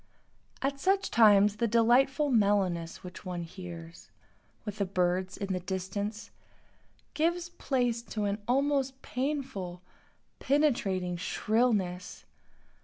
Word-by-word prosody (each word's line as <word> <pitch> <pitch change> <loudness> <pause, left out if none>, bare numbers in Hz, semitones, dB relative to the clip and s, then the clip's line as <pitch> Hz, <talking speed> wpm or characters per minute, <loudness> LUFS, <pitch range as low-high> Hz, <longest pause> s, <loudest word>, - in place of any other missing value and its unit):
At 275 +1 -1
such 385 +5 +1
times 210 -2 +6
the 235 +1 +1
delightful 260 +6 +3
mellowness 195 -6 +1
which 180 -1 -9
one 180 -3 -4
hears, 170 -1 -10 0.6
with 210 -1 -6
the 200 - +2
birds 185 0 0
in 195 -1 -3
the 185 - -1
distance, 190 +4 -4 0.8
gives 340 +2 0
place 245 -8 -1 0.2
to 210 - +1
an 205 +1 -2
almost 270 0 +1
painful, 250 -10 -3 0.6
penetrating 195 -11 +1
shrillness. 200 -2 0
210 Hz, 110 wpm, -30 LUFS, 185-265 Hz, 0.8 s, times